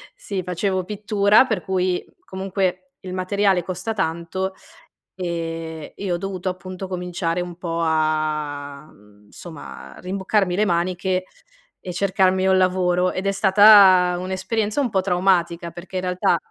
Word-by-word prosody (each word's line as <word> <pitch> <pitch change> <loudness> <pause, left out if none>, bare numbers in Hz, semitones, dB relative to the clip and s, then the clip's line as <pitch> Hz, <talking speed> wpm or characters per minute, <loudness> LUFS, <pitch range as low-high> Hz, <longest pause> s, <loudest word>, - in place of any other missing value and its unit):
sì 200 - -5
facevo 185 +1 -1
pittura 210 +3 +3
per 220 -7 -2
cui 185 -1 -1 0.2
comunque 190 -1 -3
il 185 -1 -7
materiale 190 0 +1
costa 185 +5 -4
tanto, 185 +1 -2 0.6
ehm, 165 -3 -5
e 195 -3 -3
ho - - +1
dovuto 190 -1 -4
appunto 185 +1 -7
cominciare 180 -1 -2
un 175 -1 -6
po' 170 -2 -4
a 155 -2 -1
mhmm, 105 0 -22
somma, 170 -3 -10
a - - -12
rimboccarmi 190 0 0
le 210 - +3
maniche 185 +1 0 0.6
e 180 - -6
cercarmi 190 0 +2
un 190 0 +4
lavoro 180 -1 +2
ed 185 - -4
è 195 - +3
stata 190 -2 +6
un'esperienza 205 +6 -2
un 255 - 0
po' 190 -3 +1
traumatica. 175 -2 +1
Perché 175 +2 -8
in 185 - -1
realtà 180 0 +1
185 Hz, 140 wpm, -22 LUFS, 175-190 Hz, 0.6 s, stata